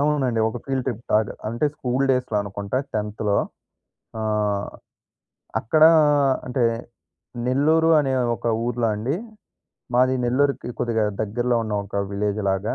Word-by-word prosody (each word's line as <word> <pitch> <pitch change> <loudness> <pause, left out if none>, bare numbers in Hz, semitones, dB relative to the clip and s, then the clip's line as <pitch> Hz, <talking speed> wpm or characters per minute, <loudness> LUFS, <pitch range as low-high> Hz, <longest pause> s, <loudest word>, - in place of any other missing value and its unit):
అవునండి. 140 -6 +1
ఒక 110 - -5
field 135 -2 -2
trip 120 -3 -3
లాగ, 105 0 +4 0.2
అంటే 120 +6 -1
స్కూల్ 130 -1 -1
డేస్‌లో 125 -4 0
అనుకుంటా 100 +4 -3 0.2
10థ్, 105 -1 -1 0.8
ఆహ్, 105 -2 0 0.9
అక్కడ 155 +8 +2 0.6
అంటే, 125 -1 0 0.8
నెల్లూరు 155 +5 +3
అనే 135 -2 -1 0.2
ఒక - - -7 0.2
ఊర్లో 120 -1 0
అండి. 120 +9 -2 0.8
మాది 130 +1 +4
నెల్లూరుకి 135 0 +1
కొద్దిగా 115 -2 +1 0.2
దగ్గరలో 120 +3 0
ఉన్న 110 -1 -3
ఒక 100 - -7 0.2
విలేజ్ 105 +1 -1
లాగా. 95 +3 -1
120 Hz, 120 wpm, -23 LUFS, 105-130 Hz, 0.9 s, లాగ